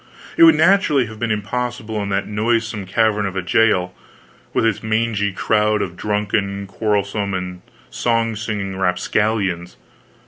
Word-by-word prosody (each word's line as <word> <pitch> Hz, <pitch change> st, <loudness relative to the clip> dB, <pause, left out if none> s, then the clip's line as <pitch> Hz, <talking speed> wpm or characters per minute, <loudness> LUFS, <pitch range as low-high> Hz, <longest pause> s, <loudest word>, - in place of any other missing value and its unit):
It 335 Hz, -, +7 dB
would 325 Hz, -, +7 dB
naturally 170 Hz, -9 st, +3 dB
have 110 Hz, -1 st, -10 dB
been 120 Hz, -, -1 dB
impossible 110 Hz, 0 st, -3 dB
in 100 Hz, -, -3 dB
that 100 Hz, 0 st, -1 dB
noisome 110 Hz, -1 st, -1 dB
cavern 105 Hz, +1 st, +1 dB
of 95 Hz, -, -6 dB
a 95 Hz, -, -2 dB
jail, 90 Hz, -3 st, +2 dB, 0.6 s
with -, -, +1 dB
its 110 Hz, -3 st, +1 dB
mangy 110 Hz, -2 st, 0 dB
crowd 105 Hz, +2 st, +1 dB
of 90 Hz, -2 st, -6 dB
drunken, 100 Hz, -1 st, -1 dB
quarrelsome, 100 Hz, -1 st, -1 dB
and 90 Hz, -1 st, -5 dB, 0.3 s
song 115 Hz, -1 st, 0 dB
singing 105 Hz, -3 st, -4 dB
rapscallions. 95 Hz, -1 st, 0 dB
105 Hz, 140 wpm, -20 LUFS, 100-115 Hz, 0.6 s, It